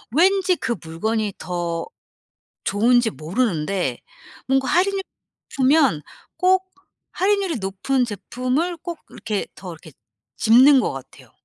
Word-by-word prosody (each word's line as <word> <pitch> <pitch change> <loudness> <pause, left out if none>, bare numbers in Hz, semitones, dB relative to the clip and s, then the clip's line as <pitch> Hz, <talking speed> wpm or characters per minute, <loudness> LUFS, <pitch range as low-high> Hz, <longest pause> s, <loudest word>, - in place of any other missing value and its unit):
왠지 375 +2 +4
그 235 -7 -2
물건이 210 +6 -2
더 170 -2 -3 0.8
좋은지 235 +3 +3
모르는데 175 - -1 0.5
뭔가 265 0 +2
할인을 390 +2 +2
해 - - -1 0.5
주면 270 - +3 0.4
꼭 375 0 +2 0.4
할인율이 390 -2 +1
높은 220 +7 -1
제품을 255 - -2
꼭 340 0 -7
이렇게 210 -2 -4
더 185 -2 -8
이렇게 160 0 -14 0.5
집는 260 +5 +6
것 - - -1
같아요. 135 -1 -12
245 Hz, 240 characters per minute, -22 LUFS, -, 0.8 s, 집는